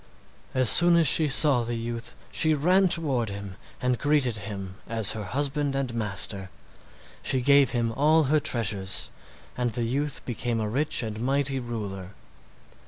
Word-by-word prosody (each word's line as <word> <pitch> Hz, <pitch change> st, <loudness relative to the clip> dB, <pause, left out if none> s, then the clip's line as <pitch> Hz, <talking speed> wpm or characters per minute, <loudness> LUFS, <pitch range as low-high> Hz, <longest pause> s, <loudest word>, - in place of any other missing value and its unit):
As 130 Hz, -1 st, +2 dB
soon 175 Hz, +6 st, +7 dB
as 165 Hz, -, +3 dB
she 155 Hz, +3 st, +5 dB
saw 140 Hz, -2 st, +4 dB
the 120 Hz, 0 st, -4 dB
youth 115 Hz, 0 st, -5 dB, 0.2 s
she 155 Hz, -1 st, +2 dB
ran 180 Hz, +6 st, +3 dB
toward 135 Hz, -, -1 dB
him 100 Hz, -1 st, -8 dB, 0.2 s
and 125 Hz, -1 st, -1 dB
greeted 145 Hz, -6 st, +1 dB
him 100 Hz, -2 st, -8 dB
as 110 Hz, -3 st, +1 dB
her 110 Hz, -2 st, -5 dB
husband 140 Hz, +5 st, -1 dB
and 135 Hz, -3 st, -2 dB
master. 100 Hz, -3 st, -2 dB, 0.7 s
She 130 Hz, -, +1 dB
gave 140 Hz, +1 st, +4 dB
him 115 Hz, -2 st, -1 dB
all 155 Hz, +6 st, +2 dB
her 150 Hz, +2 st, +2 dB
treasures, 100 Hz, -8 st, 0 dB, 0.4 s
and 125 Hz, -1 st, -1 dB
the 120 Hz, -, -2 dB
youth 140 Hz, +4 st, -3 dB
became 120 Hz, -1 st, -3 dB
a 110 Hz, -, -2 dB
rich 135 Hz, +4 st, -1 dB
and 110 Hz, -1 st, -6 dB
mighty 135 Hz, +1 st, -1 dB
ruler. 100 Hz, -6 st, -7 dB
120 Hz, 160 wpm, -25 LUFS, 110-145 Hz, 0.7 s, soon